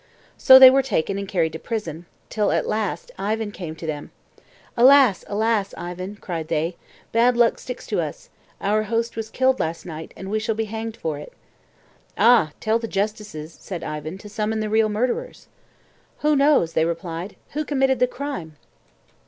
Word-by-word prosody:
So 260 Hz, -1 st, +8 dB
they 260 Hz, -1 st, +11 dB
were 270 Hz, +1 st, +4 dB
taken 200 Hz, -6 st, -1 dB
and 200 Hz, -, -5 dB
carried 165 Hz, -5 st, 0 dB
to 160 Hz, -, -6 dB
prison, 170 Hz, -7 st, -5 dB, 0.2 s
till 210 Hz, -2 st, +1 dB
a -, -, +1 dB
last 215 Hz, -3 st, -3 dB
Ivan 215 Hz, +2 st, -2 dB
came 170 Hz, -6 st, -7 dB
to 160 Hz, -, -9 dB
them. 150 Hz, -2 st, -5 dB, 0.7 s
"Alas! 255 Hz, -4 st, +6 dB
alas! 215 Hz, -1 st, 0 dB
Ivan," 180 Hz, +3 st, -6 dB
cried 170 Hz, -6 st, -5 dB
they, 165 Hz, +2 st, -1 dB, 0.4 s
"bad 235 Hz, +2 st, +3 dB
luck 235 Hz, -1 st, +3 dB
sticks 250 Hz, -, -7 dB
to -, -, -1 dB
us; -, -, -7 dB, 0.3 s
our 210 Hz, +2 st, +1 dB
host 230 Hz, +2 st, -1 dB
was 220 Hz, -1 st, -5 dB
killed 260 Hz, 0 st, +1 dB
last 165 Hz, +1 st, -3 dB
night, 160 Hz, -2 st, -8 dB
and 190 Hz, +1 st, -7 dB
we 215 Hz, -, +1 dB
shall 220 Hz, 0 st, -1 dB
be 225 Hz, 0 st, -1 dB
hanged 225 Hz, +1 st, -5 dB
for 155 Hz, -3 st, -3 dB
it." 150 Hz, -, -11 dB, 0.8 s
"Ah, 220 Hz, -8 st, +5 dB
tell 220 Hz, +1 st, +1 dB
the 230 Hz, -, -4 dB
justices," 205 Hz, -7 st, -4 dB
said 180 Hz, -4 st, -6 dB
Ivan, 155 Hz, +3 st, -5 dB
"to 205 Hz, -, -12 dB
summon 215 Hz, +1 st, -2 dB
the 215 Hz, -1 st, -3 dB
real 220 Hz, 0 st, +3 dB
murderers." 250 Hz, -, -2 dB, 0.7 s
"Who 300 Hz, 0 st, +3 dB
knows," 275 Hz, -, +3 dB
they 160 Hz, -, +2 dB
replied, 170 Hz, +3 st, -4 dB, 0.2 s
"who 305 Hz, +2 st, -2 dB
committed 270 Hz, -3 st, +1 dB
the 250 Hz, -, +4 dB
crime?" 245 Hz, -, -6 dB
210 Hz, 175 wpm, -23 LUFS, 170-235 Hz, 0.8 s, they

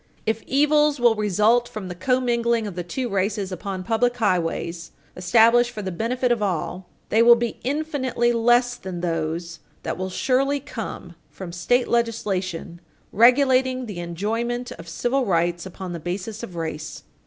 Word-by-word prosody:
If 220 Hz, 0 st, 0 dB
evils 295 Hz, +1 st, +3 dB
will 240 Hz, -1 st, +5 dB
result 215 Hz, +3 st, +2 dB
from 215 Hz, -3 st, -6 dB
the 180 Hz, -, -5 dB
commingling 235 Hz, +2 st, +1 dB
of 205 Hz, -, -5 dB
the 175 Hz, 0 st, -4 dB
two 245 Hz, +9 st, -3 dB
races 200 Hz, -1 st, -1 dB
upon 185 Hz, 0 st, -5 dB
public 240 Hz, +4 st, +1 dB
highways 175 Hz, -5 st, -1 dB, 0.2 s
established 230 Hz, +6 st, +4 dB
for 215 Hz, -4 st, -7 dB
the 190 Hz, -, -3 dB
benefit 245 Hz, +7 st, -1 dB
of 235 Hz, -3 st, +1 dB
all, 180 Hz, -1 st, -2 dB, 0.2 s
they 220 Hz, -, +4 dB
will 235 Hz, 0 st, +8 dB
be 235 Hz, 0 st, -3 dB
infinitely 260 Hz, -4 st, 0 dB
less 240 Hz, +1 st, +3 dB
than 180 Hz, -2 st, -6 dB
those 165 Hz, 0 st, -3 dB, 0.2 s
that -, -, -4 dB
will 185 Hz, 0 st, -2 dB
surely 270 Hz, +7 st, +1 dB
come 225 Hz, -9 st, -7 dB, 0.2 s
from 185 Hz, -3 st, -8 dB
state 245 Hz, +9 st, +1 dB
legislation 190 Hz, -7 st, -2 dB, 0.3 s
regulating 255 Hz, +2 st, +4 dB
the 205 Hz, -6 st, -6 dB
enjoyment 225 Hz, +8 st, -3 dB
of 165 Hz, 0 st, -10 dB
civil 245 Hz, +10 st, 0 dB
rights 175 Hz, -3 st, 0 dB
upon 185 Hz, -1 st, -7 dB
the 170 Hz, -, -5 dB
basis 190 Hz, +6 st, -5 dB
of 190 Hz, -7 st, -8 dB
race. 160 Hz, -2 st, -5 dB
220 Hz, 155 wpm, -23 LUFS, 180-245 Hz, 0.3 s, will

